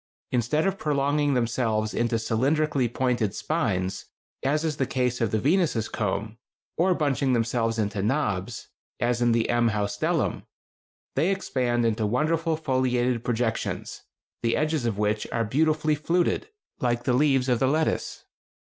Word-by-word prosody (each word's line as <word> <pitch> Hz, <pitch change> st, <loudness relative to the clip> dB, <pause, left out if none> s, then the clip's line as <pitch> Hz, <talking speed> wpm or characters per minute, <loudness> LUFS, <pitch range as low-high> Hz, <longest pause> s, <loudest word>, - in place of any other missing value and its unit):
Instead 125 Hz, +6 st, +1 dB
of 195 Hz, 0 st, -1 dB
prolonging 145 Hz, -1 st, +1 dB
themselves 115 Hz, -3 st, 0 dB
into 120 Hz, 0 st, 0 dB
cylindrically 130 Hz, +3 st, +1 dB
pointed 120 Hz, -5 st, 0 dB
spines, 95 Hz, -, -1 dB, 0.4 s
as 150 Hz, +4 st, +1 dB
in 160 Hz, -, +1 dB
the 130 Hz, -, +1 dB
case 125 Hz, -1 st, -1 dB
of 115 Hz, -, +2 dB
the 110 Hz, -, 0 dB
Venus' 145 Hz, -, +1 dB
comb, 110 Hz, +2 st, -3 dB, 0.4 s
or 180 Hz, +2 st, +2 dB
bunching 140 Hz, -4 st, +1 dB
themselves 115 Hz, -1 st, 0 dB
into 105 Hz, -2 st, -1 dB
knobs, 110 Hz, -3 st, -1 dB, 0.3 s
as 120 Hz, 0 st, 0 dB
in 120 Hz, -1 st, +4 dB
the 115 Hz, -1 st, +2 dB
M. 120 Hz, 0 st, +2 dB
haustellum, 105 Hz, -1 st, -1 dB, 0.7 s
they 170 Hz, -, +2 dB
expand 125 Hz, -11 st, 0 dB
into 110 Hz, -1 st, +1 dB
wonderful 160 Hz, +7 st, +1 dB
foliated 125 Hz, -4 st, 0 dB
projections, 120 Hz, -1 st, -2 dB, 0.4 s
the 115 Hz, 0 st, +1 dB
edges 155 Hz, -5 st, 0 dB
of 110 Hz, -4 st, -2 dB
which 105 Hz, 0 st, 0 dB
are 115 Hz, -1 st, 0 dB
beautifully 155 Hz, +5 st, +2 dB
fluted, 170 Hz, -, 0 dB, 0.3 s
like 120 Hz, -1 st, 0 dB
the 125 Hz, -, +1 dB
leaves 135 Hz, -1 st, +3 dB
of 125 Hz, -3 st, +2 dB
the 130 Hz, -, +2 dB
lettuce. 155 Hz, +3 st, -1 dB
125 Hz, 145 wpm, -26 LUFS, 115-150 Hz, 0.7 s, in